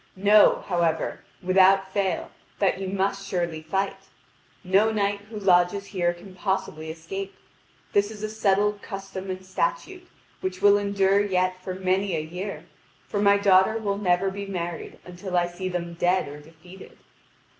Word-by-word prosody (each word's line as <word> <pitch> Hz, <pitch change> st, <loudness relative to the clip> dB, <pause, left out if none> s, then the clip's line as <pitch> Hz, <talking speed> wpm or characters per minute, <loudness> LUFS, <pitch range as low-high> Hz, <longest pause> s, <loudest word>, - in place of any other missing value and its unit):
Know, 205 Hz, +2 st, +5 dB
however, 170 Hz, -3 st, 0 dB, 0.2 s
without 190 Hz, +1 st, +4 dB
fail 195 Hz, -2 st, -1 dB, 0.3 s
that 195 Hz, -2 st, +1 dB
you 190 Hz, -, -3 dB
must 195 Hz, +1 st, -1 dB
surely 170 Hz, -4 st, -2 dB
fight. 195 Hz, +5 st, -2 dB, 0.7 s
No 195 Hz, +4 st, +3 dB
knight 205 Hz, -1 st, 0 dB
who 220 Hz, -, -7 dB
lodges 190 Hz, 0 st, +3 dB
here 180 Hz, -4 st, 0 dB
can 175 Hz, +2 st, -12 dB
possibly 185 Hz, -4 st, -3 dB
escape. 190 Hz, +5 st, -6 dB, 0.6 s
This 205 Hz, 0 st, +3 dB
is 215 Hz, -1 st, -9 dB
a 215 Hz, -, -2 dB
settled 205 Hz, -1 st, +1 dB
custom 195 Hz, -1 st, -7 dB
and 185 Hz, 0 st, -5 dB
statute, 375 Hz, -, -3 dB, 0.3 s
which 185 Hz, 0 st, -4 dB
will 205 Hz, 0 st, +5 dB
endure 200 Hz, 0 st, +2 dB
yet 185 Hz, -2 st, 0 dB
for 185 Hz, -1 st, -4 dB
many 190 Hz, 0 st, 0 dB
a -, -, 0 dB
year, 180 Hz, +6 st, -6 dB, 0.4 s
for 205 Hz, -, -2 dB
my 200 Hz, 0 st, +5 dB
daughter 200 Hz, +2 st, +4 dB
will 200 Hz, -2 st, -2 dB
never 190 Hz, 0 st, +2 dB
be 200 Hz, +1 st, -6 dB
married 175 Hz, -3 st, -5 dB
until 180 Hz, +1 st, -4 dB
I 175 Hz, -, +3 dB
see 175 Hz, +2 st, -5 dB
them 170 Hz, -1 st, -4 dB
dead 175 Hz, +1 st, +1 dB
or 145 Hz, +1 st, -9 dB
defeated." 165 Hz, +5 st, -15 dB
190 Hz, 155 wpm, -25 LUFS, 180-200 Hz, 0.7 s, Know